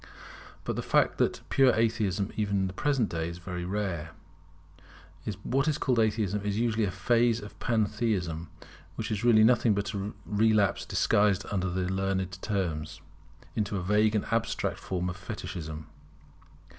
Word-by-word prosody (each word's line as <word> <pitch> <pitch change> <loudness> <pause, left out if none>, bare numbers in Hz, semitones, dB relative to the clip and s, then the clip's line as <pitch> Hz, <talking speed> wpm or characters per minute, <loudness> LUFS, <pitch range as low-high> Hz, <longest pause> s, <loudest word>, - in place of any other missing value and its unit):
But - - -2
the - - -2
fact - - +3
is - - -23
that - - -14
pure 135 -2 +5
Atheism 110 -4 0
even 100 -2 0
in - - +1
the 95 - -4
present 135 0 +1
day 80 -1 -3
is 85 - -7
very 90 0 -5
rare. 90 -5 -3 1.3
What 135 +3 +1
is 155 -2 +2
called 125 -5 +1
Atheism 105 -2 +1
is 105 0 -1
usually 115 -1 +1
a - - -1
phase 115 +2 +2
of 105 -1 -11
Pantheism, 105 -8 0 0.5
which - - -4
is 105 0 -2
really 115 -3 +6
nothing 115 -2 +4
but 100 +2 -2
a 100 +1 -3
relapse 105 -2 +2
disguised 100 -1 +2
under 95 -2 0
learned 95 0 -1
terms, 85 -7 -2 0.6
into 105 -2 -1
a 90 - -3
vague 105 +3 +3
and 105 - 0
abstract 115 0 -1
form 90 -1 -2
of 90 0 -4
Fetichism. 80 -3 -6
100 Hz, 155 wpm, -29 LUFS, 90-110 Hz, 1.3 s, really